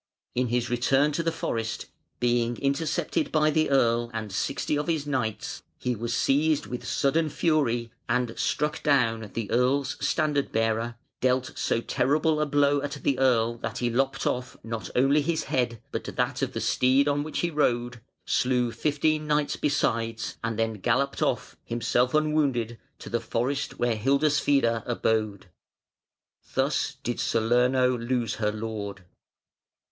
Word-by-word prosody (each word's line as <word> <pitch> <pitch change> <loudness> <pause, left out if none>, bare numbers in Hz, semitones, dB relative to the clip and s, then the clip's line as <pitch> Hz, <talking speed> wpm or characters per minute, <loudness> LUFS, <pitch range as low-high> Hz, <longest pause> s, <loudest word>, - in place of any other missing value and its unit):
In 125 0 +1
his 120 +1 0
return 135 +4 +3
to 150 - -1
the 165 0 0
forest, 115 -8 -3 0.3
being 120 -1 +1
intercepted 150 - -1
by 155 -1 +3
the 155 +1 +2
Earl 120 -3 +2
and 110 -2 -4
sixty 140 +9 -1
of 150 +2 -2
his 160 -4 0
knights, 125 -7 -2 0.2
he 125 -1 -1
was 115 +2 -4
seized 150 +3 +2
with 125 - -6
sudden 155 +3 +1
fury, 125 -8 +1 0.2
and 120 -1 +1
struck 150 +2 -1
down 115 -7 +2
the 115 -3 -3
Earl's 130 +3 +1
standard 145 0 +1
bearer, 115 +1 0 0.2
dealt 130 0 +1
so 115 - 0
terrible 150 +5 +1
a 150 - +1
blow 145 0 +3
at 145 0 -4
the 135 -2 +1
Earl 120 -3 +3
that 115 -1 -4
he 120 -1 0
lopped 135 +3 0
off 125 0 -2
not 115 -1 -5
only 135 +4 +4
his 160 +1 -1
head 120 -3 -1
but - - -4
that - - -2
of - - -1
the - - -3
steed 130 +3 +3
on 145 0 +1
which 155 +1 -3
he 175 - 0
rode, 120 -5 0 0.2
slew 125 -2 +1
fifteen 155 +3 0
knights 150 -1 +1
besides, 115 -6 -1
and 115 -1 -2
then 115 0 0
galloped - - 0
off, - - -1
himself 120 +3 0
unwounded, 140 -7 +1 0.2
to - - -11
the 120 - -1
forest 130 +5 -2
where 120 -1 +1
Hildeswide 140 -1 +2
abode. 110 -4 0 1.1
Thus - - +1
did 120 - -2
Salerno 125 +3 +2
lose 120 -1 -1
her 105 0 +2
lord. 105 -3 -5
125 Hz, 150 wpm, -27 LUFS, 115-145 Hz, 1.1 s, only